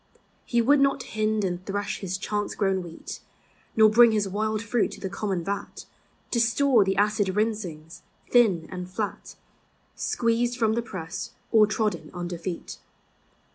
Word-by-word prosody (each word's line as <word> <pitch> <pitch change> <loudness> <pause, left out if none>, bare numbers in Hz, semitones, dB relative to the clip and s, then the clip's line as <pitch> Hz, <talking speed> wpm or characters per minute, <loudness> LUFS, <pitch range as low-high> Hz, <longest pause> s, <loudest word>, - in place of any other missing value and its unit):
He 235 -1 +2
would 285 +4 +5
not 275 -1 +2
bind 215 0 +1
and 180 -1 -2
thresh 205 +1 -3
his 190 -1 -3
chance 205 +1 -3
grown 195 -2 +1
wheat, 170 -2 -8 0.6
Nor 220 -1 +7
bring 230 +1 +6
his 210 -2 +1
wild 215 +2 -1
fruit 230 0 +1
to - - -10
the 190 - -5
common 195 -3 -2
vat, 200 +3 -5 0.5
To 235 - +1
store 240 0 +4
the 195 0 0
acid 205 -2 +1
rinsings, 190 -8 -3 0.3
thin 195 -10 +4
and 180 0 -6
flat, 205 +2 -5 0.6
Squeezed 235 +1 0
from 220 -3 +2
the 235 - 0
press 190 -5 -6 0.2
or 215 -2 +6
trodden 205 -8 -1
under 175 -1 -4
feet. 170 0 -6
210 Hz, 155 wpm, -26 LUFS, 185-225 Hz, 0.6 s, Nor